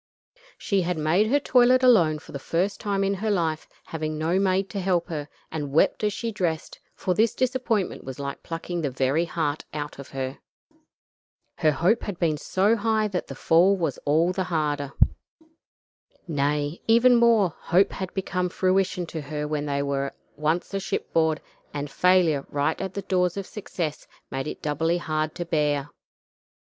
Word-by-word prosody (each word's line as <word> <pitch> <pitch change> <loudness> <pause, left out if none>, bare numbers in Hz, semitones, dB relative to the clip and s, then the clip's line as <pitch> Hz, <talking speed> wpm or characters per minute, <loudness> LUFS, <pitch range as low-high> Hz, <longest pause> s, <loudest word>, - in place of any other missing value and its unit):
She 200 -2 0
had 180 -1 -1
made 165 +7 +2
her 285 +6 +3
toilet 255 -1 +4
alone 175 -12 +5
for - - -13
the 140 - -5
first 180 +8 -1
time 200 -1 0
in 195 0 +1
her 210 +3 -2
life, 165 -6 0 0.2
having 155 -1 -4
no 165 +4 +1
maid 195 0 +2
to 200 - -3
help 180 -2 0
her, 150 -3 -4 0.2
and 150 -3 -4
wept 160 +7 +2
as 210 - +2
she 230 +2 -3
dressed, 175 -6 -3 0.2
for 185 - -1
this 220 +4 +2
disappointment 250 -6 0
was 130 -1 -7
like 140 0 -5
plucking 170 +1 -4
the 145 - 0
very 135 +5 +1
heart 155 -3 -2
out 145 -1 -5
of 140 - -9
her. 135 0 -4 1.2
Her 155 - +4
hope 180 +10 +2
had 205 -4 -5
been 160 -4 +1
so 195 +8 +2
high 220 -1 +1
that 185 -3 -3
the 135 - -7
fall 175 +8 +4
was 160 -7 -2
all 160 +5 +2
the 185 0 -2
harder. 150 -5 -1 1.3
Nay, 145 0 -1
even 235 +2 +6
more; 225 -7 +4
hope 185 +4 +3
had 190 -1 -5
become 180 -2 -1
fruition 185 0 +1
to 160 -1 -6
her 150 +1 -4
when 150 -1 -2
they 140 0 0
were 140 -1 -2 0.2
once 155 +6 -1
a 195 - 0
shipboard, 160 -4 0 0.3
and 145 -1 -4
failure 180 -6 +3
right 145 +2 0
at 190 -1 -4
the 200 - -3
door 180 -1 +2
of 200 -1 -4
success 170 -7 -5 0.2
made 135 +2 -3
it - - -7
doubly 160 +3 +1
hard 155 -2 -2
to 175 - -4
bear. 150 -4 0
170 Hz, 175 wpm, -25 LUFS, 150-195 Hz, 1.3 s, even